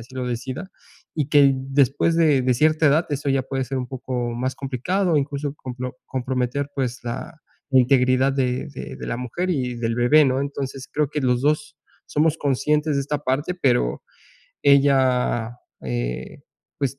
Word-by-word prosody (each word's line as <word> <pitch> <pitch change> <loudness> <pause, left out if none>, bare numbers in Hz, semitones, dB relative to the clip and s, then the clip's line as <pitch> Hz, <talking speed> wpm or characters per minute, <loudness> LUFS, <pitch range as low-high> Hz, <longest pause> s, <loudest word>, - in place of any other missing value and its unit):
así 125 +3 -13
lo 125 -1 -3
decida. 130 +9 -5 0.4
Y 150 -3 -1
que 145 -2 +6
después 135 +4 +1
de 150 -5 +4
de 125 -1 +2
cierta 155 +3 +3
edad, 155 +4 +3
eso 145 0 -2
ya 135 -1 +2
puede 135 0 -3
ser 135 +2 -4
un 125 - -3
poco 125 -2 -3
más 130 +2 -2
complicado, 150 +7 -1
incluso, 140 0 -3
complo 125 0 -6
comprometer, 130 +2 -2
pues, 130 -2 -2
la 150 +8 -5 0.4
integridad 130 +1 +4
de 130 -2 -1
de 65 - -7
de - - -7
la 115 - -2
mujer 170 +10 -3
y 125 -7 -1
del 115 -1 -1
bebé, 145 +5 +5
¿no? 130 0 +1
Entonces, 135 -1 -5
creo 150 -2 +1
que 150 - -2
los 125 -1 +1
2 150 0 0 0.3
somos 155 +1 +1
conscientes 150 +2 +1
de - - +1
esta 145 +1 -2
parte, 145 +6 -1
pero 125 - +1 0.6
ella, 130 -4 +3 0.3
eh, - - -4 0.4
pues, 135 -1 -2
135 Hz, 165 wpm, -23 LUFS, 125-145 Hz, 0.6 s, que